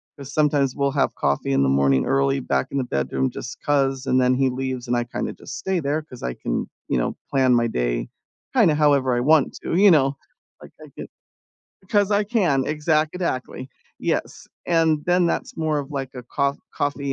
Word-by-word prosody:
'cause 140 -1 -10
sometimes 145 -3 +1
we'll 140 -1 0
have 140 0 0
coffee 70 -1 0
in 70 0 +3
the 65 - +2
morning 70 0 +3
early 70 0 +1
back 65 -1 -1
in 140 - -3
the 135 - +1
bedroom 70 - -1
just - - -8
'cause, 135 -2 +1
and 130 -1 +2
then 125 0 +3
he 135 0 +2
leaves 130 -1 -4
and 120 - +1
I 120 - 0
kinda 120 - -4
just - - -9
stay 190 -2 -1
there 150 +1 -1
'cause 125 -6 -13
I 60 0 -3
can, - - -3 0.2
you 60 - 0
know, - - -2
plan 130 -2 +3
my 120 0 +2
day - - -2 0.5
kinda 195 -12 +5
however 140 -4 +3
I 120 - 0
want 150 +1 +3
to, - - -3
you 200 +3 +6
know, 140 -5 +4 0.5
like, - - -13
I - - -13
can - - -7 0.7
because 205 +1 +1
I 205 0 +2
can, 185 - +1
exactly, 155 -3 -1 0.3
yes, - - -3 0.2
and 160 -3 +2
then 175 0 +3
that's - - -2
more 155 -2 0
of 140 0 -6
like 135 -2 -5
a 125 - -7
coff 140 +3 -1 0.2
coffee 140 -1 -2
135 Hz, 200 wpm, -23 LUFS, 125-155 Hz, 0.7 s, you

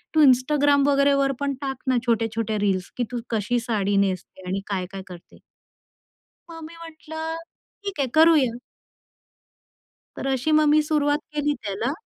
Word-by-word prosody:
तू 310 - +6
Instagram 285 +2 +4
वगैरेवर 280 -1 +3
पण 280 -1 -1
टाक 270 -1 -5
ना 255 - +3
छोट्या-छोट्या 225 -1 0
रील्स 190 -2 -1
की 245 - 0
तू 245 - -3
कशी 225 +2 0
साडी 205 -4 -1
नेसते 185 0 -7
आणि 190 +2 -2
काय-काय 195 0 -4
करते. 175 -2 -13 1.1
मग 330 -1 -9
मी 335 - -13
म्हंटलं 320 0 -6 0.5
ठीक 400 -6 -5
आहे 270 - +1
करूया. 300 -8 +5 1.6
तर - - -4
अशी 265 +4 -1
मग 305 0 +5
मी 305 +1 +5
सुरुवात 295 -1 +1
केली 295 0 0
त्याला. 210 +5 -2
270 Hz, 145 wpm, -24 LUFS, 215-295 Hz, 1.6 s, तू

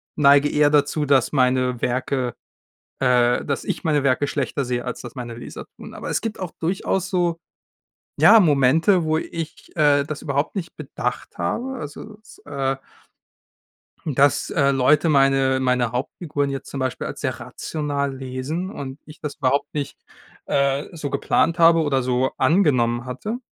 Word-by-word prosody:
neige 145 0 +5
eher 150 0 +3
dazu, 150 +1 +2
dass 135 -3 +3
meine 125 -2 +1
Werke, 125 0 -1 0.7
äh 125 -2 +3
dass 140 -2 -2
ich - - -4
meine 150 -3 +1
Werke 140 +1 +2
schlechter 140 -1 -2
sehe 120 0 -2
als 125 - -5
das - - -10
meine 120 -2 -6
Leser 120 - -9
tun. - - -11
Aber - - -6
es - - 0
gibt 225 -1 -4
auch 185 -3 -5
durchaus 190 +2 -1
so, 175 -3 0 0.8
ja, 225 - +8
Momente, 160 +3 +3
wo 155 0 +1
ich, 165 -1 -7
äh, 145 -3 +4
das 150 0 -6
überhaupt 140 +1 -1
nicht 180 -3 -5
bedacht 125 -4 -5
habe, 245 - -2
also, 205 +6 -8
dass, 215 - -18
äh 135 -1 -2 1.3
dass, 140 -2 +2
äh, 140 -3 +3
Leute 145 +4 +3
meine 135 -2 +3
meine 125 -3 +1
Hauptfiguren 145 +3 -2
jetzt 135 -1 -5
zum 140 - -5
Beispiel 130 -1 -2
als - - -7
sehr - - -2
rational 145 -3 -3
lesen 135 +8 -4
und 135 -8 -7
ich 150 - -14
das 150 -2 -5
überhaupt 140 0 0
nicht, 140 -2 -4 0.5
äh, 140 0 +1
so 150 -3 -4
geplant 165 +4 +1
habe 165 0 +6
oder 140 -4 +1
so 125 +1 +1
angenommen 125 -9 +2
hatte, 130 - -4
140 Hz, 160 wpm, -22 LUFS, 130-155 Hz, 1.3 s, ja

